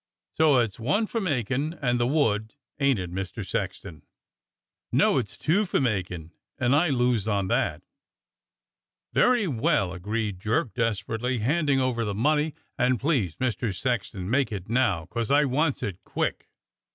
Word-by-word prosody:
So 155 -4 +4
it's 115 -4 0
one 200 - +1
for 230 +1 -3
makin' 140 - -1
and 125 -3 +1
the 120 - +2
wood, 110 -6 +1 0.2
ain't 140 -3 +3
it. 90 -2 -5
Mister 95 -1 -4
Sexton.?^" 80 -4 -4 0.9
"No, - - +4
it's 105 -6 -6
two 180 +7 +2
for 185 - 0
makin', 90 - -2 0.3
and 130 +2 +2
I 160 +3 +3
lose 125 -5 +1
on 100 -3 0
that." - - 0 1.3
"Very 245 -5 +3
well," 110 - +1
agreed 105 +1 -3
Jerk 110 +3 0
desperately, 115 +2 -1
handing 140 +4 +1
over 125 -3 0
the 105 -2 -2
money, 150 +6 +1 0.2
"and 125 -1 +2
please, 120 - 0
Mister 120 -3 -1
Sexton, 100 -3 -2
make 130 +4 +1
it 100 -3 -5
now, 115 -8 +1
'cos 110 +5 -3
I 145 +1 +4
wants 145 +3 0
it 95 -3 -5
quick." - - -3
120 Hz, 150 wpm, -26 LUFS, 100-140 Hz, 1.3 s, So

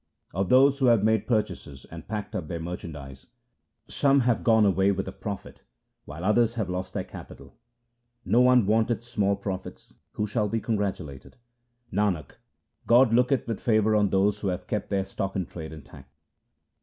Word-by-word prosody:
1 90 - -2
Of 95 - -1
those 135 +2 +5
who 130 - +3
have 115 -4 +4
made 110 -1 +2
purchases 105 - -2
and - - -10
packed 105 -2 -5
up 80 - -4
their 85 +1 -4
merchandise, 75 -6 -8 0.6
Some 140 -1 +2
have 120 -2 +1
gone 110 -2 +4
away 95 0 +3
with 95 -1 -3
a - - -4
profit 100 0 -7
2 - - -33 0.4
while 80 +5 -7
others 115 +3 +2
have 110 -6 -2
lost 90 +1 -5
their - - -1
capital. - - -12 0.7
No 120 - +3
one 125 -3 +5
wanteth 110 +2 +1
small 105 -4 0
profits; 100 -2 -7
who 105 - -1
shall 105 0 -1
be 115 - -1
congratulated? 95 - -4 0.6
Nanak, 90 -8 -1 0.5
God 120 0 +5
looketh 125 +2 +2
with 115 -3 -3
favour 110 -2 +2
on 105 -2 +3
those 100 +2 +1
who 100 - -3
have 90 -1 -3
kept 105 +1 -3
their 95 -2 0
stock 95 0 -4
in 95 -3 -1
trade 80 -1 -8
intact. 70 -2 -13
105 Hz, 180 wpm, -26 LUFS, 90-115 Hz, 0.7 s, those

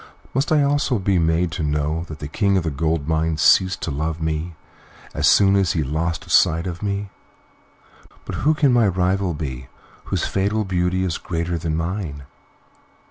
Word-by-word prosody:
Must 135 +5 0
I 150 -2 +4
also 140 -3 +1
be 95 -2 +1
made 80 +1 +1
to 85 - -4
know 75 +2 -1
that 80 - -8
the 75 - -6
King 100 +5 +1
of 90 - 0
the 80 - -2
Gold 80 +1 -1
Mines 80 -1 0
ceased 95 0 +4
to 80 - -2
love 80 +3 -3
me 80 +1 -3 0.6
as - - +1
soon 100 -1 +5
as 95 -4 +2
he 80 - 0
lost 80 +4 -3
sight 85 +2 +4
of 85 -2 -5
me? 100 -1 -3 1.1
But - - -5
who 155 +2 +3
can 140 -4 +3
my 120 -3 +4
rival 95 -1 0
be, 65 -4 -6 0.4
whose - - -1
fatal 105 +2 0
beauty 90 0 0
is 90 -3 -2
greater 85 0 -3
than 80 -1 -2
mine?" 80 -4 -4
85 Hz, 180 wpm, -21 LUFS, 80-100 Hz, 1.1 s, soon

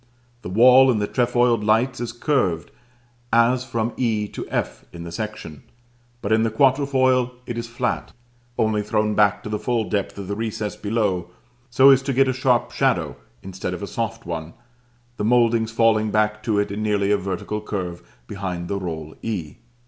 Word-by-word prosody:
The - - -7
wall 125 +6 +6
in 120 - +3
the 105 - 0
trefoiled 120 -2 +2
lights 115 +5 +2
is 120 -1 -3
curved, 120 - -1 0.6
as 120 +2 +3
from 115 -1 -2
e 110 -4 0
to - - -7
f - - -3
in 85 -1 -9
the 85 - -7
section; 95 -7 -6 0.6
but 100 - -2
in 110 0 +4
the 115 - +2
quatrefoil 130 0 +2
it 120 - -5
is 115 0 -4
flat, 120 +1 -3 0.5
only 110 -1 +1
thrown 105 0 0
back 105 -1 +2
to - - -6
the 105 0 -2
full 120 -3 -1
depth 100 -2 -2
of 100 -2 -6
the 100 - -3
recess 110 -1 -3
below 100 -5 -1 0.4
so 135 +3 +7
as 135 -1 +5
to 135 0 -2
get 135 +1 +3
a 130 - +1
sharp 125 -2 +1
shadow - - 0 0.3
instead 95 -1 -5
of 90 - -8
a - - -1
soft 115 +2 -4
one, 80 -1 -5 0.6
the - - -3
mouldings 115 -1 +3
falling 115 -1 +2
back 105 0 +1
to 110 -2 0
it 100 0 0
in 105 +2 -4
nearly 105 -2 +1
a 105 - +4
vertical 100 +2 -4
curve 90 -5 -5 0.2
behind 90 -1 -5
the 100 - -1
roll 80 -4 -6
e. 90 -10 -4
110 Hz, 185 wpm, -22 LUFS, 100-120 Hz, 0.6 s, so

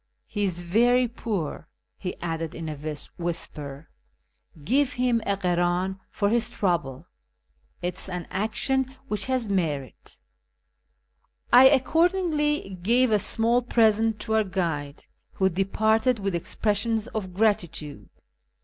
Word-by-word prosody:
He 205 -1 -2
is 175 -2 -2
very 240 +8 +3
poor," 215 - -4 0.3
he 180 - -5
added 165 -1 -3
in 165 -1 -5
a 150 0 -5 0.2
whisper, 150 -4 -5 0.3
" 150 - -23
give 280 - +2
him 245 -2 +1
a 200 -1 +1
krdn 180 +1 0
for 200 - 0
his 235 0 +1
trouble; 170 - -1 0.8
it 180 +1 -2
is - - -5
an 180 -2 -5
action 260 +6 -1
which 210 -2 -1
has 255 -3 0
merit." 155 - -3 1.4
I 260 +2 +10
accordingly 300 - +1
gave 240 +5 +3
a 210 - +4
small 230 +5 +2
present 225 -2 +2
to 220 - -2
our 220 0 +4
guide, 165 -7 -3 0.3
who 190 -1 +2
departed 220 +6 +1
with 195 -2 -2
expressions 210 +5 0
of 185 -5 -5
gratitude. 165 - -1
200 Hz, 125 wpm, -26 LUFS, 175-235 Hz, 1.4 s, I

